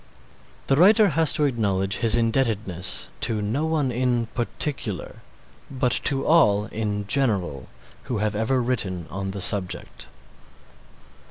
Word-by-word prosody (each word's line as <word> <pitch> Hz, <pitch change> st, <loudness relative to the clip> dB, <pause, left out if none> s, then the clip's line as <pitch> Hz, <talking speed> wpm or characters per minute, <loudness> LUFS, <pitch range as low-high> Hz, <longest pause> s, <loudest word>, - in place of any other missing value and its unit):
The 135 Hz, -, +2 dB
writer 200 Hz, +6 st, +5 dB
has 160 Hz, 0 st, +4 dB
to 150 Hz, -, 0 dB
acknowledge 100 Hz, -7 st, -1 dB
his 115 Hz, -2 st, +2 dB
indebtedness 115 Hz, -6 st, -1 dB
to 110 Hz, -2 st, 0 dB
no 115 Hz, +10 st, -2 dB
one 150 Hz, -5 st, 0 dB
in 120 Hz, -1 st, 0 dB
particular, 120 Hz, -4 st, -2 dB, 0.5 s
but 125 Hz, -2 st, -1 dB
to 135 Hz, -1 st, +1 dB
all 105 Hz, -11 st, +3 dB
in 105 Hz, -2 st, -4 dB
general 100 Hz, -, -1 dB, 0.4 s
who 120 Hz, -, -3 dB
have 105 Hz, 0 st, -1 dB
ever 115 Hz, +5 st, 0 dB
written 95 Hz, -9 st, -2 dB
on 95 Hz, +1 st, -4 dB
the 95 Hz, 0 st, -6 dB
subject. 95 Hz, -1 st, 0 dB
115 Hz, 125 wpm, -23 LUFS, 100-135 Hz, 0.5 s, writer